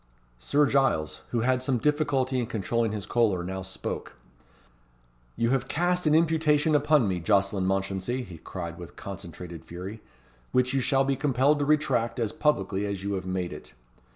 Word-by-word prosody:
Sir 145 - +3
Giles, 135 - +1
who 120 - 0
had 130 +2 +2
some 130 -1 0
difficulty 135 -1 +1
in 120 - -1
controlling 115 0 -1
his 105 -2 -4
choler, 105 -7 +1
now 95 +1 -4
spoke: 95 0 -6 1.2
"You 115 +1 +1
have 135 -1 +1
cast 180 +1 0
an 155 - +5
imputation 160 -2 +3
upon 150 -4 +4
me, 90 -2 -1
Jocelyn 100 +1 +1
Mounchensey," 95 +6 -1
he 85 -8 -10
cried 85 -2 -6
with 85 - -10
concentrated 90 -3 -8
fury, 95 +5 -8 0.5
"which 125 +1 +2
you 135 - +2
shall 135 +1 +3
be 135 0 +1
compelled 135 +2 +2
to 145 - +1
retract 135 -6 +1
as 115 -3 0
publicly 100 -9 0
as 100 -1 -4
you 100 0 -2
have 95 -1 -3
made 90 -1 -2
it. - - -11
115 Hz, 170 wpm, -27 LUFS, 95-140 Hz, 1.2 s, an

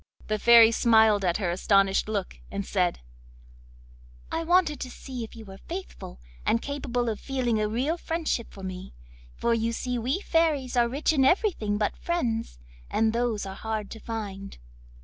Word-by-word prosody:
The 215 0 0
Fairy 230 0 +8
smiled 220 -3 +4
at 175 -2 +1
her 185 -5 -1
astonished 195 +2 +2
look, 200 -4 -3
and 200 -1 -4
said: 180 - 0 1.3
'I 330 - -2
wanted 335 -5 +3
to 255 - -5
see 250 -1 -7
if 225 - -10
you 225 -1 -10
were 195 -1 -11
faithful 350 - -7 0.2
and 230 - +2
capable 250 -3 -3
of 220 -2 -2
feeling 245 -5 -1
a 210 - 0
real 265 +10 0
friendship 325 -8 -2
for 195 - -12
me, 185 - -7 0.4
for 235 - +1
you 230 0 0
see 245 +1 -2
we 255 +10 -1
fairies 315 -9 +1
are 240 -1 +3
rich 285 +5 0
in 275 -3 +3
everything 265 - +2
but 210 0 -1
friends, 235 - -2 0.3
and 220 0 +1
those 235 -3 -1
are 190 - -6
hard 215 0 -4
to 225 - -8
find. 200 -4 -6
230 Hz, 170 wpm, -27 LUFS, 205-265 Hz, 1.3 s, Fairy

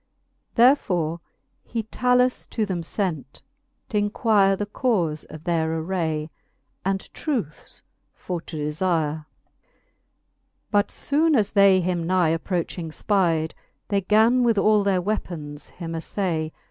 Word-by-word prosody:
Therefore 180 - +3 0.4
he 230 -2 -3
Talus 250 +3 +1
to 220 - -1
them 185 -4 -3 0.2
lent, 165 -10 -3 0.4
t'inquire 205 -1 +2
The 205 - -2
caufe 195 - -1
of 155 0 -10
their 165 -2 0
aray, 160 -2 -2 0.5
and 195 +1 -2
truce 230 - -4 0.3
for 175 -2 -5
to 165 - -8
delire. 155 +1 0
LIII. 155 - -13 1.5
But 205 -2 +3
Ibone 310 +2 +1
as 205 -2 +1
they 200 -2 +5
him 175 -2 -1
nigh 180 -2 +3
approching 165 0 -2
Ipide, 165 -3 +1 0.4
They 200 -1 +1
gan 220 +6 +4
with 235 -3 +3
all 210 0 +4
their 190 -3 +1
weapons 160 -8 -4
him 170 -2 -7
aflay. 165 -1 -2
185 Hz, 120 wpm, -24 LUFS, 160-210 Hz, 1.5 s, they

